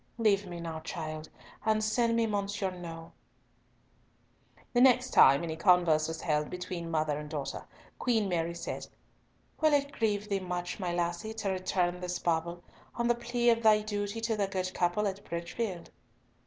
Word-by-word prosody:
Leave 205 Hz, -3 st, +2 dB
me 175 Hz, -1 st, -6 dB
now, 165 Hz, -1 st, -5 dB
child, 155 Hz, -1 st, -6 dB, 0.3 s
and 215 Hz, -1 st, +2 dB
send 230 Hz, +2 st, +2 dB
me 230 Hz, 0 st, +3 dB
Monsieur 200 Hz, -2 st, -1 dB
Nau." 165 Hz, -2 st, -8 dB, 1.6 s
The 245 Hz, -, +4 dB
next 255 Hz, 0 st, +5 dB
time 140 Hz, +4 st, +7 dB
any 160 Hz, -2 st, -3 dB
converse 165 Hz, -3 st, +4 dB
was 160 Hz, 0 st, -5 dB
held 150 Hz, -1 st, 0 dB
between 180 Hz, -2 st, -5 dB
mother 155 Hz, -2 st, 0 dB
and 150 Hz, 0 st, -7 dB
daughter, 150 Hz, -3 st, -4 dB, 0.3 s
Queen 225 Hz, -4 st, +1 dB
Mary 170 Hz, -2 st, -1 dB
said, 170 Hz, -, -5 dB, 0.7 s
"Will 310 Hz, -1 st, +4 dB
it 285 Hz, 0 st, +2 dB
grieve 210 Hz, -5 st, 0 dB
thee 200 Hz, -2 st, 0 dB
much, 180 Hz, 0 st, -4 dB
my 180 Hz, -3 st, -2 dB
lassie, 175 Hz, +5 st, -2 dB
to 205 Hz, -3 st, -1 dB
return 180 Hz, -1 st, 0 dB
this 180 Hz, 0 st, -3 dB
bauble, 170 Hz, +1 st, -1 dB, 0.3 s
on 235 Hz, 0 st, 0 dB
the -, -, +6 dB
plea 240 Hz, 0 st, +1 dB
of 230 Hz, 0 st, +1 dB
thy 215 Hz, -2 st, +5 dB
duty 205 Hz, 0 st, -3 dB
to 225 Hz, 0 st, 0 dB
the 200 Hz, -2 st, 0 dB
good 185 Hz, -1 st, -3 dB
couple 175 Hz, +4 st, +1 dB
at 200 Hz, +1 st, -4 dB
Bridgefield?" 175 Hz, +2 st, -4 dB
185 Hz, 170 wpm, -30 LUFS, 170-215 Hz, 1.6 s, time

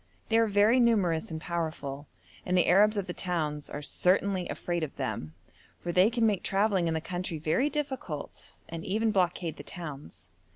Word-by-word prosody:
They 225 Hz, -, +4 dB
are 225 Hz, -, +4 dB
very 210 Hz, +4 st, +4 dB
numerous 195 Hz, -9 st, +2 dB
and 160 Hz, -1 st, -4 dB
powerful, 155 Hz, -4 st, -4 dB, 0.4 s
and 180 Hz, -, +1 dB
the 180 Hz, -, +4 dB
Arabs 210 Hz, +4 st, +5 dB
of 200 Hz, -, -1 dB
the 180 Hz, -, -5 dB
towns 155 Hz, -6 st, -2 dB
are 145 Hz, -, -6 dB
certainly 185 Hz, +3 st, +1 dB
afraid 175 Hz, -1 st, -2 dB
of 155 Hz, -3 st, -4 dB
them, 100 Hz, -, -4 dB, 0.4 s
for 175 Hz, -, -3 dB
they 185 Hz, +4 st, +5 dB
can 235 Hz, -1 st, +1 dB
make 205 Hz, -4 st, +2 dB
travelling 195 Hz, -3 st, +1 dB
in 165 Hz, -, 0 dB
the 160 Hz, -, -1 dB
country 175 Hz, 0 st, -4 dB
very 160 Hz, -, +1 dB
difficult, 265 Hz, -, -5 dB
and 165 Hz, 0 st, -6 dB
even 220 Hz, +3 st, +1 dB
blockade 180 Hz, -4 st, 0 dB
the -, -, -8 dB
towns. 150 Hz, -, -8 dB
180 Hz, 180 wpm, -29 LUFS, 160-205 Hz, 0.4 s, Arabs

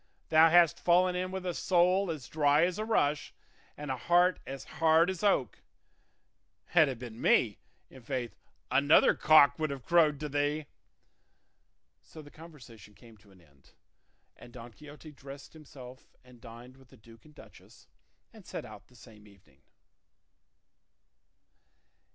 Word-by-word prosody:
Thou 160 Hz, +1 st, +5 dB
hast 170 Hz, -1 st, +3 dB
fallen 180 Hz, +1 st, +2 dB
in 185 Hz, +1 st, -3 dB
with 190 Hz, 0 st, -7 dB
a 180 Hz, -, -3 dB
soul 180 Hz, +2 st, +1 dB
as 150 Hz, -6 st, -6 dB
dry 150 Hz, +1 st, +2 dB
as 180 Hz, +3 st, -4 dB
a 215 Hz, -, -3 dB
rush 150 Hz, -10 st, -1 dB, 0.4 s
and 145 Hz, -2 st, -6 dB
a -, -, -2 dB
heart 175 Hz, +7 st, +1 dB
as 135 Hz, 0 st, -8 dB
hard 165 Hz, +2 st, +1 dB
as 185 Hz, -, -8 dB
oak; 195 Hz, -, 0 dB, 1.1 s
had 160 Hz, -4 st, +3 dB
it 130 Hz, -, -6 dB
been 120 Hz, -1 st, -11 dB
me, 105 Hz, -5 st, +1 dB, 0.3 s
i'faith 130 Hz, -1 st, -7 dB, 0.4 s
'another 145 Hz, +2 st, +4 dB
cock 155 Hz, -1 st, +4 dB
would 155 Hz, -1 st, -2 dB
have 140 Hz, -3 st, -8 dB
crowed 155 Hz, -4 st, +2 dB
to 150 Hz, -, -5 dB
thee.'" 145 Hz, +1 st, -2 dB, 1.4 s
So 155 Hz, -, -14 dB
the 145 Hz, -, -16 dB
conversation 125 Hz, -, -16 dB
came 115 Hz, +2 st, -18 dB
to 105 Hz, 0 st, -24 dB
an 95 Hz, -2 st, -21 dB
end, 70 Hz, -4 st, -27 dB, 0.6 s
and 120 Hz, -, -16 dB
Don 120 Hz, -1 st, -12 dB
Quixote 150 Hz, +2 st, -14 dB
dressed 140 Hz, 0 st, -13 dB
himself 130 Hz, -5 st, -15 dB
and 125 Hz, -2 st, -20 dB
dined 120 Hz, +2 st, -14 dB
with 135 Hz, -1 st, -21 dB
the 130 Hz, -, -20 dB
duke 115 Hz, +1 st, -19 dB
and 150 Hz, -1 st, -21 dB
duchess, -, -, -18 dB, 0.5 s
and -, -, -16 dB
set -, -, -8 dB
out -, -, -14 dB
the 125 Hz, -, -24 dB
same 110 Hz, -3 st, -17 dB
evening. 90 Hz, -9 st, -24 dB
145 Hz, 150 wpm, -29 LUFS, 120-165 Hz, 1.4 s, Thou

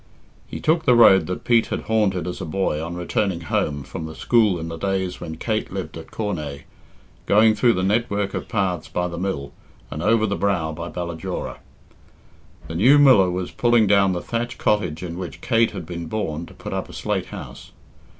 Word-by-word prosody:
He -, -, -6 dB
took 160 Hz, +1 st, +1 dB
the 125 Hz, -, +5 dB
road 95 Hz, -7 st, +6 dB
that 90 Hz, -, -4 dB
Pete 115 Hz, -2 st, +3 dB
had -, -, -3 dB
haunted 100 Hz, -6 st, 0 dB
as 90 Hz, +1 st, -5 dB
a -, -, -3 dB
boy 80 Hz, -2 st, -1 dB
on 85 Hz, +1 st, -5 dB
returning 90 Hz, 0 st, -1 dB
home 75 Hz, -3 st, -1 dB
from 80 Hz, +4 st, -7 dB
school 110 Hz, -4 st, +3 dB
in 80 Hz, -, -5 dB
the 80 Hz, -, -5 dB
days 95 Hz, +1 st, -2 dB
when 80 Hz, 0 st, -6 dB
Kate 110 Hz, +3 st, -2 dB
lived 95 Hz, -1 st, -5 dB
at 80 Hz, -1 st, -9 dB
Cornaa, 75 Hz, -10 st, -4 dB, 0.6 s
going 110 Hz, +2 st, +5 dB
through 120 Hz, +2 st, +3 dB
the 90 Hz, -, -1 dB
network 100 Hz, 0 st, 0 dB
of -, -, -5 dB
paths 95 Hz, -6 st, -1 dB
by 90 Hz, 0 st, -2 dB
the 85 Hz, -1 st, -6 dB
mill, 90 Hz, -7 st, -3 dB, 0.4 s
and 75 Hz, -, -4 dB
over 110 Hz, +4 st, +3 dB
the 100 Hz, -1 st, -1 dB
brow 90 Hz, -6 st, 0 dB
by 85 Hz, +2 st, -6 dB
Ballajora. 85 Hz, +1 st, -5 dB, 1.1 s
The -, -, -6 dB
new 120 Hz, -, +5 dB
miller 130 Hz, -10 st, +6 dB
was 90 Hz, 0 st, -3 dB
pulling 120 Hz, -2 st, +3 dB
down 100 Hz, -1 st, +4 dB
the 85 Hz, -, -3 dB
thatched 120 Hz, +1 st, -3 dB
cottage 90 Hz, -6 st, 0 dB
in 85 Hz, 0 st, -5 dB
which 90 Hz, -2 st, -6 dB
Kate 115 Hz, -1 st, +2 dB
had 85 Hz, -, -7 dB
been 85 Hz, -1 st, -6 dB
born 85 Hz, -5 st, -3 dB
to -, -, -15 dB
put -, -, -7 dB
up -, -, -3 dB
a -, -, -11 dB
slate -, -, -2 dB
house. -, -, -9 dB
95 Hz, 200 wpm, -22 LUFS, 85-110 Hz, 1.1 s, road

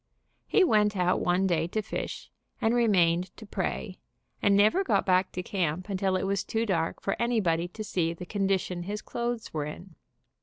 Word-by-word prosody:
He 405 Hz, -, +4 dB
went 210 Hz, -, +3 dB
out 180 Hz, 0 st, +2 dB
one 180 Hz, +2 st, +2 dB
day 165 Hz, -3 st, +1 dB
to 215 Hz, +5 st, -2 dB
fish, -, -, -5 dB, 0.3 s
and 225 Hz, -, +2 dB
remained 185 Hz, -7 st, +3 dB
to 220 Hz, -, -10 dB
pray, 190 Hz, -1 st, -3 dB, 0.4 s
and 200 Hz, -1 st, +4 dB
never 215 Hz, -, +4 dB
got -, -, +1 dB
back 185 Hz, 0 st, +3 dB
to 180 Hz, -, -3 dB
camp 180 Hz, -1 st, -2 dB
until 190 Hz, -1 st, 0 dB
it 185 Hz, -, 0 dB
was 195 Hz, 0 st, 0 dB
too 225 Hz, +1 st, -1 dB
dark 165 Hz, -6 st, -1 dB
for 195 Hz, -, -1 dB
anybody 185 Hz, -8 st, +1 dB
to 215 Hz, +5 st, -7 dB
see 170 Hz, -5 st, 0 dB
the 180 Hz, -, -8 dB
condition 190 Hz, -2 st, -1 dB
his 205 Hz, +4 st, -5 dB
clothes 240 Hz, -1 st, -3 dB
were 150 Hz, -2 st, -2 dB
in. 170 Hz, +4 st, -9 dB
190 Hz, 185 wpm, -28 LUFS, 175-215 Hz, 0.4 s, He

